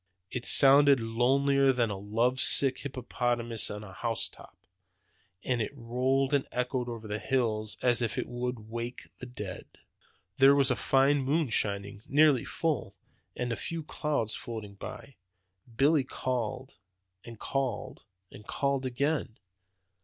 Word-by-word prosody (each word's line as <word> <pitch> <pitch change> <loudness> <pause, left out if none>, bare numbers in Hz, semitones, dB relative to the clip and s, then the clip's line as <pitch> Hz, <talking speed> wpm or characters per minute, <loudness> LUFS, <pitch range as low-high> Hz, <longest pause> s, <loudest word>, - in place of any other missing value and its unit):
It 125 - -3
sounded 140 0 +7
lonelier 135 +4 +2
than 120 -4 0
a - - -3
love 115 +6 0
sick 135 -1 +3
hippopotamus 120 -3 -2
on 105 0 -6
the 100 -3 -11
house 115 +4 -2
top. - - -16 0.9
It 120 -4 -1
rolled 130 +3 0
and 140 -2 +1
echoed 125 0 -2
over 115 -2 -7
the 105 +1 -3
hills 110 -5 -1
as 120 -1 +3
if 115 -2 -2
it - - -2
would 120 -2 -4
wake 120 +1 -6
the 125 - -8
dead. 105 -7 -7 0.7
"There 135 +1 +7
was 140 -2 +4
a - - +2
fine 135 +3 +3
moon 145 +2 0
shining, 100 -1 0
nearly 145 -3 +4
full, 145 -11 -2 0.4
and 125 -1 -3
a - - 0
few 165 +9 -5
clouds 145 -8 -2
floating 110 -4 -6
by. 130 +6 -10 0.6
Billy 145 +1 +4
called, 130 -1 -4 0.5
and 115 -1 -10
called, 130 -6 -3 0.3
and 105 - -13
called 140 -1 -1
again. 135 -1 -1
125 Hz, 140 wpm, -29 LUFS, 115-135 Hz, 0.9 s, sounded